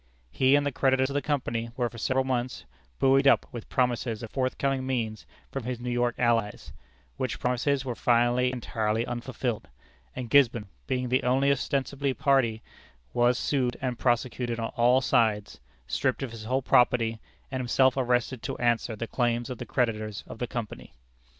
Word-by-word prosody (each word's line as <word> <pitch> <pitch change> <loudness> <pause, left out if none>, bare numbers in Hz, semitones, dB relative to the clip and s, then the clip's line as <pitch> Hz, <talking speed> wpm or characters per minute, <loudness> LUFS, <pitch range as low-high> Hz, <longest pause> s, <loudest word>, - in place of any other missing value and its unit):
He 130 - +4
and 145 0 +2
the 145 - 0
creditors 130 0 +2
of - - -4
the 145 - 0
company 120 -6 -2
were 120 -2 +1
for 115 0 -10
several 130 +3 +1
months 125 -1 -2 0.3
buoyed 135 +1 +4
up 135 - +5
with 120 -2 -8
promises 120 -3 0
of 115 - -7
forthcoming 135 0 -1
means 115 -5 -3 0.2
from 135 -4 -5
his 125 -1 -3
New 125 0 -4
York 120 0 +1
allies, 115 -3 0 0.4
which 130 -3 -3
promises 130 +2 0
were 125 - -2
finally 120 +2 +2
entirely 115 -2 -1
unfulfilled; 120 -1 -4 0.5
and 125 -1 -4
Gisborne, 120 -7 +4 0.2
being 125 -2 -1
the 130 +1 +2
only 135 +3 +2
ostensible 140 0 -1
party, 120 -5 +2 0.5
was 120 +1 +3
sued 130 -4 0
and 125 -2 -3
prosecuted 120 -1 0
on 115 - -2
all 125 +2 +3
sides, 110 - +1 0.3
stripped 65 - -1
of 130 - -4
his 110 -2 -9
whole 130 +3 0
property, 115 -3 +3 0.3
and 130 - -2
himself 130 +1 +3
arrested 125 -1 0
to - - -4
answer 120 -1 0
the 115 - -4
claims 120 0 -1
of 125 - -6
the - - -6
creditors 110 -4 -1
of - - -10
the 125 - -2
company. 115 -3 -6
125 Hz, 170 wpm, -27 LUFS, 115-130 Hz, 0.5 s, up